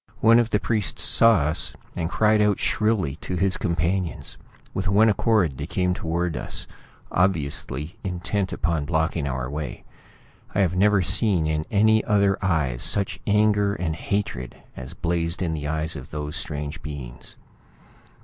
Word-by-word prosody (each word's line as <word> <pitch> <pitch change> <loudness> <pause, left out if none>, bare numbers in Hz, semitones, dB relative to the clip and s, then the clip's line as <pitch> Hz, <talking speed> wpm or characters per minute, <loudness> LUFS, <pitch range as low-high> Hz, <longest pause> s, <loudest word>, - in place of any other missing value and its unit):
One 115 +1 +6
of 120 -1 +1
the 105 - +1
priests 105 +2 -1
saw 115 0 +5
us, 75 +3 -1 0.2
and 85 -1 -2
cried 105 +1 +3
out 105 -2 +3
shrilly 105 -10 0
to 90 - -5
his 95 +2 +1
companions. 85 +2 -2 0.4
With 95 0 -2
one 105 +4 +5
accord 105 - +1
they - - -4
came 90 -1 0
toward 85 0 -2
us, - - -4 0.5
obviously 75 -4 -1
intent 95 +1 -2
upon 80 -2 -1
blocking 80 -2 0
our 65 -2 -3
way. 75 -1 -5 0.7
I 100 - +3
have 90 -2 +1
never 100 0 +4
seen 95 -4 +2
in 75 0 -1
any 110 +1 +4
other 100 -2 +2
eyes 75 -10 0
such 100 -2 0
anger 105 -1 +3
and 80 -2 -2
hatred 80 -8 -3 0.2
as 65 0 -8
blazed 85 0 -1
in 85 -3 -1
the 75 -2 -4
eyes 80 +1 -1
of 70 0 -8
those 75 +1 -5
strange 75 -1 -4
beings. 65 -4 -8
85 Hz, 155 wpm, -24 LUFS, 75-100 Hz, 0.7 s, One